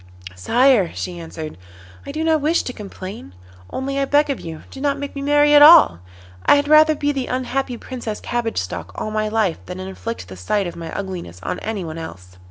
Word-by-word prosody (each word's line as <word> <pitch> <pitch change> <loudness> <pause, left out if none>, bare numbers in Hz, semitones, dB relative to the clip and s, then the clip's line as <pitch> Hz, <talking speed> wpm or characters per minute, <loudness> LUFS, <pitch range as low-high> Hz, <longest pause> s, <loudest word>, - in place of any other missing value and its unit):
'Sire,' 230 - +3
she 175 -1 -5
answered, 160 - -8 0.5
'I - - -4
do 315 +1 -2
not 320 -2 +2
wish 315 +4 +2
to 250 - -5
complain, 190 - -9 0.3
only 275 +1 -3
I 275 - +1
beg 290 +1 +3
of 270 - -3
you 160 -2 -8
do 270 - -9
not 285 0 +1
make 285 0 -6
me 280 - -4
marry 290 +1 +4
at 290 - +8
all. 305 - +8 0.4
I - - +6
had 285 0 +1
rather 310 +1 +6
be 290 0 0
the 270 -3 -3
unhappy 255 0 -2
Princess 235 -4 -6
Cabbage 240 -2 -3
Stalk 90 0 -4
all 215 - -4
my 215 0 0
life 215 -6 0
than 180 0 -6
inflict 190 +5 -6
the 95 - -9
sight 190 - -1
of 175 - -6
my 165 -1 -7
ugliness 180 - -6
on - - -3
anyone 180 -7 -5
else. 90 - -10
225 Hz, 205 wpm, -20 LUFS, 170-280 Hz, 0.5 s, at